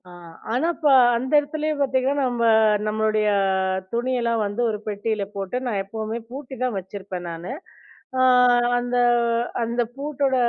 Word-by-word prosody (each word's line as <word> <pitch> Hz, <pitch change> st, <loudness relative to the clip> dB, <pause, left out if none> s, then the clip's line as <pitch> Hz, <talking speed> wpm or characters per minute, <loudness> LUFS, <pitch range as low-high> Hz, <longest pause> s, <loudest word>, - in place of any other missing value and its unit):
ஆ. -, -, -13 dB, 0.4 s
ஆனா, 255 Hz, +8 st, +1 dB
இப்போ 300 Hz, -3 st, +2 dB, 0.2 s
அந்த 255 Hz, +3 st, -3 dB
இடத்துலேயே 305 Hz, +1 st, -2 dB
பார்த்தீங்கன்னா, 265 Hz, -1 st, +1 dB
நம்ப 240 Hz, -1 st, -2 dB, 0.4 s
நம்மளுடைய 215 Hz, 0 st, +1 dB, 0.7 s
துணியெல்லாம் 235 Hz, -2 st, 0 dB
வந்து 205 Hz, +4 st, -3 dB
ஒரு 215 Hz, -, -2 dB
பெட்டியில 210 Hz, 0 st, -2 dB
போட்டு, 195 Hz, +4 st, -3 dB
நான் 210 Hz, -5 st, -1 dB
எப்பவுமே 220 Hz, +3 st, -5 dB
பூட்டி 270 Hz, 0 st, -8 dB
தான் 250 Hz, -4 st, -1 dB
வச்சிருப்பேன் 190 Hz, -1 st, -7 dB
நானு. 170 Hz, +5 st, -6 dB, 0.7 s
அ -, -, +3 dB, 0.6 s
அந்த 245 Hz, 0 st, -1 dB, 0.7 s
அந்த 235 Hz, +1 st, -1 dB
பூட்டோட 280 Hz, -1 st, -1 dB
235 Hz, 130 wpm, -23 LUFS, 210-260 Hz, 0.7 s, அ